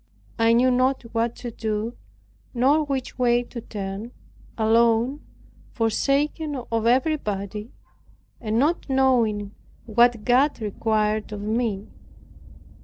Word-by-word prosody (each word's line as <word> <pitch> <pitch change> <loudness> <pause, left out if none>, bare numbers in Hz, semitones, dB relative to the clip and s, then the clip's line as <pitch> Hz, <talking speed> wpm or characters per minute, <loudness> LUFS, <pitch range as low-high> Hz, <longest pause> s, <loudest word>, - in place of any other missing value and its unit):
I 225 0 +4
knew 250 +2 +4
not 255 +2 +1
what 230 0 0
to 240 - -7
do, 220 +1 -3 0.6
nor 280 +6 +3
which 270 -3 -4
way 240 -1 +3
to 240 0 -8
turn, 205 +2 -6 0.5
alone, 230 +4 +2 0.5
forsaken 280 +6 0
of 230 -3 -2
everybody, 215 - -1 0.7
and 220 -1 -2
not 300 +5 +1
knowing 235 -6 +2 0.3
what 235 -1 +3
God 260 +4 +3
required 215 0 -1
of 210 -1 -5
me. 215 -1 -1
235 Hz, 105 wpm, -24 LUFS, 215-255 Hz, 0.7 s, I